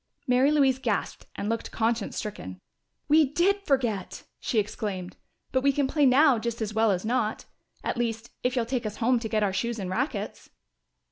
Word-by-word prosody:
Mary 255 Hz, +2 st, +4 dB
Louise 270 Hz, -4 st, +3 dB
gasped -, -, -2 dB
and 205 Hz, -, -3 dB
looked 230 Hz, +1 st, -2 dB
conscience 225 Hz, -1 st, -1 dB
stricken. 95 Hz, -, -6 dB, 0.5 s
"We 310 Hz, +2 st, +6 dB
did 390 Hz, +6 st, +2 dB
forget!" 235 Hz, -9 st, 0 dB, 0.2 s
she 235 Hz, -, -2 dB
exclaimed. 200 Hz, -3 st, -2 dB, 0.4 s
"But 260 Hz, -, +2 dB
we 280 Hz, +1 st, +4 dB
can 275 Hz, 0 st, +1 dB
play 290 Hz, 0 st, +3 dB
now 265 Hz, -1 st, +5 dB
just 235 Hz, +1 st, -3 dB
as 215 Hz, -1 st, -3 dB
well 220 Hz, 0 st, +3 dB
as 185 Hz, 0 st, 0 dB
not 225 Hz, -2 st, -1 dB, 0.4 s
at -, -, -2 dB
least, 230 Hz, -1 st, -2 dB
if 250 Hz, +1 st, 0 dB
you'll 240 Hz, -2 st, +1 dB
take 240 Hz, -1 st, -2 dB
us 210 Hz, -, -6 dB
home 245 Hz, +1 st, +2 dB
to 225 Hz, -1 st, -5 dB
get 215 Hz, -1 st, +1 dB
our 195 Hz, -2 st, +1 dB
shoes 235 Hz, +4 st, -1 dB
and 190 Hz, -3 st, -4 dB
rackets." 260 Hz, +10 st, -3 dB
235 Hz, 190 wpm, -27 LUFS, 215-265 Hz, 0.5 s, We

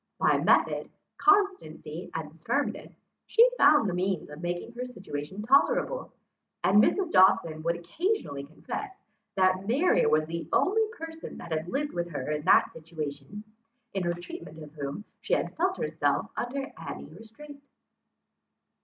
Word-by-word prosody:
By -, -, +3 dB
method, -, -, +2 dB, 0.3 s
constancy 400 Hz, -1 st, +1 dB
and -, -, -6 dB
firmness, -, -, -1 dB, 0.4 s
she 465 Hz, +2 st, +6 dB
found 290 Hz, -, +5 dB
the 185 Hz, -, -1 dB
means 180 Hz, -3 st, -2 dB
of 150 Hz, +2 st, -9 dB
making 175 Hz, +5 st, -3 dB
her 245 Hz, +1 st, -5 dB
situation 190 Hz, -6 st, -6 dB
tolerable; -, -, +2 dB, 0.5 s
and 205 Hz, +2 st, +6 dB
Mrs. 370 Hz, -, +1 dB
Dawson 165 Hz, -4 st, +4 dB
would 170 Hz, +2 st, 0 dB
occasionally 170 Hz, -, -2 dB
confess, 380 Hz, -, -7 dB, 0.4 s
that 185 Hz, 0 st, +2 dB
Mary 280 Hz, +11 st, +3 dB
was 155 Hz, 0 st, +3 dB
the 165 Hz, +1 st, -5 dB
only 440 Hz, +3 st, +3 dB
person 325 Hz, 0 st, -8 dB
that 170 Hz, -, -9 dB
had 160 Hz, +1 st, -2 dB
lived 290 Hz, +7 st, -2 dB
with 175 Hz, 0 st, -2 dB
her 150 Hz, -2 st, -4 dB
in 150 Hz, 0 st, -1 dB
that -, -, +5 dB
situation, 155 Hz, +3 st, -7 dB, 0.5 s
in 195 Hz, -, -1 dB
her 175 Hz, -1 st, 0 dB
treatment 175 Hz, -, -9 dB
of 150 Hz, 0 st, -12 dB
whom 145 Hz, +7 st, -5 dB, 0.2 s
she -, -, +1 dB
had -, -, -3 dB
felt 370 Hz, +3 st, 0 dB
herself -, -, -1 dB
under 270 Hz, +3 st, -4 dB
any -, -, -7 dB
restraint. 280 Hz, +6 st, -13 dB
195 Hz, 145 wpm, -28 LUFS, -, 0.5 s, she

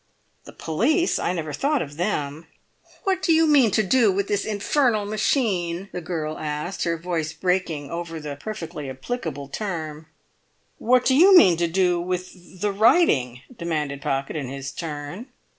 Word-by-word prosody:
"The -, -, -11 dB
police! 270 Hz, -, +1 dB
I -, -, 0 dB
never 160 Hz, -4 st, -4 dB
thought 280 Hz, -, 0 dB
of 145 Hz, -1 st, -10 dB
them." 160 Hz, -3 st, -3 dB, 0.6 s
"What 380 Hz, -1 st, 0 dB
do 345 Hz, -, +2 dB
you 325 Hz, 0 st, +5 dB
mean 285 Hz, -7 st, +5 dB
to 215 Hz, +2 st, +2 dB
do 225 Hz, +1 st, +4 dB
with 200 Hz, +1 st, -1 dB
this—this 205 Hz, +1 st, -1 dB
infernal 215 Hz, +1 st, +1 dB
machine?" 195 Hz, -5 st, 0 dB
the 180 Hz, -, -5 dB
girl 160 Hz, -2 st, -4 dB
asked, 150 Hz, +5 st, -3 dB
her 170 Hz, -1 st, 0 dB
voice 165 Hz, -2 st, -3 dB
breaking 165 Hz, -4 st, -1 dB
over 170 Hz, -1 st, -5 dB
the 150 Hz, -2 st, -6 dB
perfectly 165 Hz, -4 st, -6 dB
applicable 145 Hz, -, -5 dB
term. 160 Hz, -4 st, -5 dB, 0.7 s
"What 250 Hz, +1 st, +3 dB
do 260 Hz, -, +4 dB
you 370 Hz, +6 st, +8 dB
mean 185 Hz, -, +7 dB
to 170 Hz, 0 st, +1 dB
do 175 Hz, 0 st, +1 dB
with—the 180 Hz, +2 st, -4 dB
writing?" 195 Hz, -, +3 dB
demanded 150 Hz, -6 st, -3 dB
Pocket 135 Hz, +1 st, -2 dB
in 145 Hz, -4 st, -3 dB
his 135 Hz, 0 st, -6 dB
turn. 160 Hz, -, -6 dB
175 Hz, 160 wpm, -23 LUFS, 155-215 Hz, 0.7 s, you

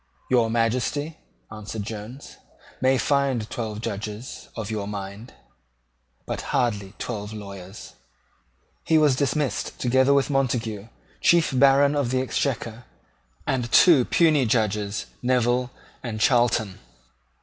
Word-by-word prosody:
"Your 120 Hz, -3 st, +3 dB
Majesty," 125 Hz, +7 st, -1 dB, 0.3 s
answered 105 Hz, 0 st, -6 dB
Jones, 110 Hz, +5 st, -8 dB, 0.4 s
"may 130 Hz, +1 st, +3 dB
find 135 Hz, -5 st, +1 dB
twelve 110 Hz, -2 st, -4 dB
Judges 110 Hz, +2 st, -6 dB
of 110 Hz, -2 st, -5 dB
your 105 Hz, -2 st, -3 dB
mind, 100 Hz, +3 st, -7 dB, 0.9 s
but -, -, -4 dB
hardly 105 Hz, -7 st, -1 dB
twelve 105 Hz, -3 st, -5 dB
lawyers." 100 Hz, -1 st, -9 dB, 0.9 s
He 160 Hz, 0 st, +3 dB
was 150 Hz, -4 st, +4 dB
dismissed 140 Hz, 0 st, -1 dB
together 130 Hz, +2 st, +3 dB
with 140 Hz, +1 st, +2 dB
Montague, 120 Hz, -6 st, -1 dB, 0.3 s
Chief 170 Hz, -2 st, +4 dB
Baron 140 Hz, +2 st, +5 dB
of 140 Hz, -4 st, 0 dB
the 130 Hz, +1 st, +1 dB
Exchequer, 120 Hz, -3 st, -2 dB, 0.6 s
and 125 Hz, -3 st, -1 dB
two 160 Hz, -8 st, +7 dB
puisne 155 Hz, -7 st, +3 dB
Judges, 105 Hz, -2 st, 0 dB, 0.2 s
Neville 125 Hz, 0 st, +1 dB, 0.3 s
and 115 Hz, -3 st, -5 dB
Charlton. 115 Hz, -4 st, +2 dB
120 Hz, 115 wpm, -24 LUFS, 110-135 Hz, 0.9 s, two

